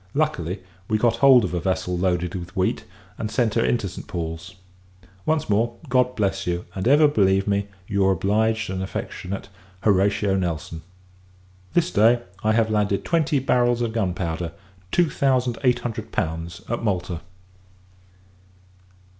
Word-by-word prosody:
Luckily, 95 - -1 0.2
we 110 - +2
got 115 +1 +2
hold 130 -4 +7
of 90 - -4
a 90 - 0
vessel 90 0 -1
loaded 90 -1 0
with 95 +1 -7
wheat, 95 -1 0 0.3
and 110 - -2
sent 115 -2 +1
her 115 - +2
into 115 -4 +1
St. 95 - -9
Paul's. 85 +1 -5 0.7
Once 160 -1 +1
more, 115 +3 +1
God 125 0 +2
bless 95 -3 -1
you! 90 0 -1
and 95 +3 -2
ever 150 +3 +6
believe 95 -7 +2
me, 100 0 0 0.2
your 95 -1 +2
obliged 110 +3 +1
and 95 0 -3
affectionate 95 0 -5 0.3
HORATIO 100 0 +2
NELSON. 80 -2 -3 0.9
This 175 0 +2
day, 115 +3 +4 0.2
I 110 0 +3
have 110 -1 +2
landed 105 -2 0
twenty 160 -4 +2
barrels 120 -2 +2
of 115 -2 -2
gunpowder 90 -5 -2 0.4
(two 175 -1 +3
thousand 130 -3 +1
eight 125 -2 +3
hundred 110 -2 -5
pounds) 80 -1 -3
at 120 - -2
Malta. 90 -5 -1
100 Hz, 145 wpm, -23 LUFS, 90-120 Hz, 0.9 s, hold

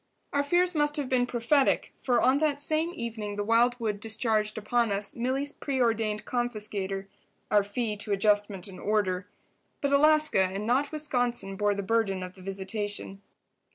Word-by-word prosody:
Our 285 - +3
fears 350 +5 +2
must 295 -1 +2
have 285 -3 -2
been 245 -1 +2
prophetic, 250 +4 +1
for 245 -2 +2
on 260 +4 +3
that 295 -2 +1
same 310 +3 +1
evening 220 -5 -4
the 205 - -2
wildwood 230 -1 +2
discharged 215 -1 0
upon 230 +1 +1
us 200 0 -2
Milly's 265 +4 -1
preordained 225 -6 -1
confiscator—our 210 -4 -2
fee 210 +2 -2
to 205 +1 -5
adjustment 205 -1 +1
and 190 -2 -10
order. 195 -3 0 0.5
But 280 -1 0
Alaska 305 -5 +4
and 190 +2 -1
not 265 +5 +1
Wisconsin 245 -9 -1
bore 205 +1 +1
the 200 - -3
burden 195 -3 0
of 180 0 -7
the 190 - -15
visitation. 195 +1 -4
225 Hz, 155 wpm, -28 LUFS, 205-260 Hz, 0.5 s, Alaska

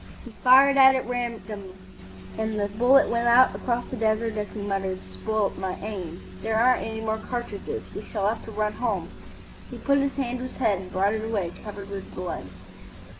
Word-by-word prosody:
He 240 - -9
fired 270 +2 +7
at 265 -1 +6
random, 220 -6 -4 0.6
and 220 -1 -2
the 205 - +1
bullet 245 +7 +5
went 235 0 0
out 245 +2 +6
across 245 -1 -1
the - - -6
desert 220 0 0
as 210 -1 -2
he 215 - -8
muttered, 195 -2 -2
"Spoilt 200 - -2
my 190 -1 -2
aim. 185 -5 -6 0.2
There 220 0 -1
aren't 250 +3 +4
any 220 0 -4
more 220 0 -1
cartridges. 240 -3 -5
We 210 - -6
shall 200 -3 -1
have 220 +2 -1
to 225 - -8
run 210 0 -1
home." 200 -8 -2 0.6
He - - -8
put 280 0 +2
his 275 0 0
hand 250 -2 -2
to 255 - -4
his - - -13
head 215 -7 +2
and 185 -1 -9
brought 195 +3 +2
it 220 0 -2
away 205 -6 -1
covered 200 -1 -8
with 195 -1 -7
blood. 180 - -4
220 Hz, 195 wpm, -26 LUFS, 200-245 Hz, 0.6 s, fired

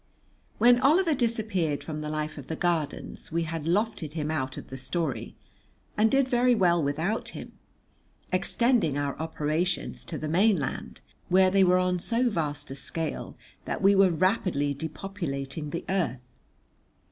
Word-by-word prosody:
When 245 +1 +6
Oliver 320 +5 +4
disappeared 220 - 0
from 155 -2 -5
the 150 - -4
life 155 0 -3
of 135 - -10
the 160 - -3
Gardens 165 -3 -2
we 170 +1 0
had 160 -1 -4
lofted 180 -3 0
him 155 -1 -2
out 130 -4 -2
of - - -9
the 130 - -7
story, 140 +3 -3 0.6
and 220 +1 +4
did 270 +1 +3
very 250 -1 +3
well 175 -5 +3
without 160 +10 -1
him, - - -8 0.8
extending 235 - +2
our 140 -1 -1
operations 160 +2 -2
to 160 - -5
the 155 - -4
mainland, 180 - +1 0.3
where 185 +1 +5
they 195 0 +5
were 180 0 +5
on 180 0 +1
so 240 +6 +1
vast 150 -8 -3
a - - -5
scale 160 +3 -4 0.3
that - - -3
we 195 +1 +6
were 195 -1 +5
rapidly 170 -5 +1
depopulating 155 -2 -5
the 170 - -5
earth. 130 -10 -2
170 Hz, 155 wpm, -27 LUFS, 150-200 Hz, 0.8 s, When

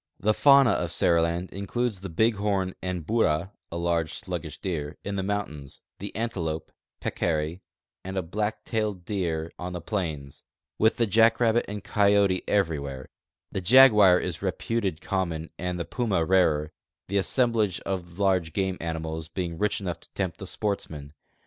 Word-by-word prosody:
The 110 +2 +2
fauna 140 0 +6
of 85 - 0
Seriland 85 +1 +2
includes 100 +1 -2
the 95 - -6
bighorn 100 -1 +1
and 90 -3 -3
bura 95 -5 +1 0.2
(a 85 - -3
large, 85 -2 0
sluggish - - -5
deer) 75 -5 -4
in 100 0 -3
the 95 - 0
mountains, 95 -9 -4 0.2
the - - -7
antelope, 90 -9 -3 0.3
peccary, 80 +1 -1 0.4
and 95 -2 -4
black 105 +1 -2
tail 110 -3 -1
deer 85 -4 -3
on 90 0 -5
tlie 85 -1 -7
plains, 80 -10 -4 0.4
with 110 +1 +3
the 115 - +3
jackrabbit 115 +2 +4
and 105 -1 -6
coyote 100 -2 +3
every 85 -7 +1
where; 70 -2 -7 0.4
the 95 - -3
jaguar 105 -4 +7
is 85 -3 -4
reputed 95 -1 -2
common 85 -5 -2
and 90 0 -2
the 85 - -2
puma 105 -10 0
rarer 80 -4 +3 0.2
— - - -66
the 100 - 0
assemblage 110 -3 +1
of 90 -3 -5
large 95 -5 +1
game 95 -2 -1
animals 80 -1 -4
being 85 0 -4
rich 105 0 +1
enough 90 -4 -4
to - - -15
tempt 95 -3 -2
the 95 - -7
sportsman. 80 -9 -4
95 Hz, 155 wpm, -26 LUFS, 85-105 Hz, 0.4 s, jaguar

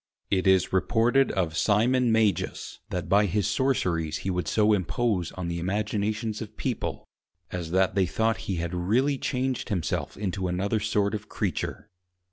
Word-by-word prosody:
It 95 -1 +2
is 95 -1 +3
reported 120 +7 +3
of 85 -4 -1
Simon 115 +6 +3
Magus, 110 -5 0
that 90 -1 -3
by 105 +1 +4
his 100 +3 0
Sorceries 95 - 0
he 95 - +1
would 90 -1 -2
so 110 0 +3
impose 100 -1 0
on 90 -2 -4
the 85 0 -2
Imaginations 105 +3 -1
of 110 -1 -8
People, 125 -4 -3 0.5
as 85 -3 -4
that 95 +2 +2
they 95 -2 +2
thought 110 +5 +1
he 95 - 0
had 85 0 -3
really 120 +11 +1
changed 130 0 -2
himself 90 -6 -2
into 95 -2 -2
another 100 +5 0
sort 105 0 0
of 105 0 -5
Creature. 100 -7 -3
100 Hz, 160 wpm, -27 LUFS, 90-110 Hz, 0.5 s, by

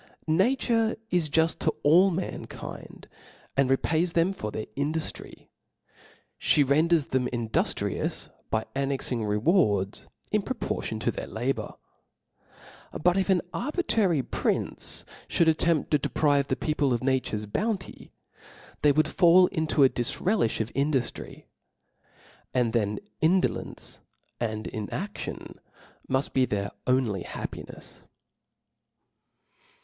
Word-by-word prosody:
Nature 225 +6 +2
is 170 -4 +1
juft 160 +2 +2
to - - +2
allinankind, 180 +4 0 0.5
and 135 -1 +3
repays 165 +5 +1
them 170 +3 +2
for 105 - -5
their 110 0 -4
induftry: 155 +3 -3 0.9
ftie 145 -3 +4
renders 155 +2 +3
them 130 -1 +1
indultrious 115 -3 -1 0.2
by 110 0 0
annexing 135 -4 -1
rewards 105 - +1 0.2
in 210 - +2
proportion 260 +6 -3
to - - 0
their - - -6
la - - -1
bour. - - -6 1.2
But 175 +3 +3
if 195 0 0
an 185 -3 +3
arbitrary 220 - +1
prince - - -2 0.2
fhould 170 - +3
attempt 160 -1 +2
to 150 - +4
deprive 140 0 +2
people 150 -4 +1
of 120 - -2
nature's 130 -5 0
bouncy, 195 - -3 0.7
they 145 - +5
would 155 +2 +3
fall 180 0 +6
into 160 -4 +2
a 135 - +7
dlfrelifli 120 - 0
of 110 - -4
induftry; 140 -3 -2 1.1
and 120 -3 +2
then 105 -3 +1 0.2
indolence 180 +4 0 0.4
and 110 -2 -2
inadion 165 - -5 0.5
muft; 130 +2 0
be 130 -1 +4
their 100 -3 -2 0.2
only 125 -7 +1
happinefs. - - -8
150 Hz, 110 wpm, -27 LUFS, 125-175 Hz, 1.2 s, a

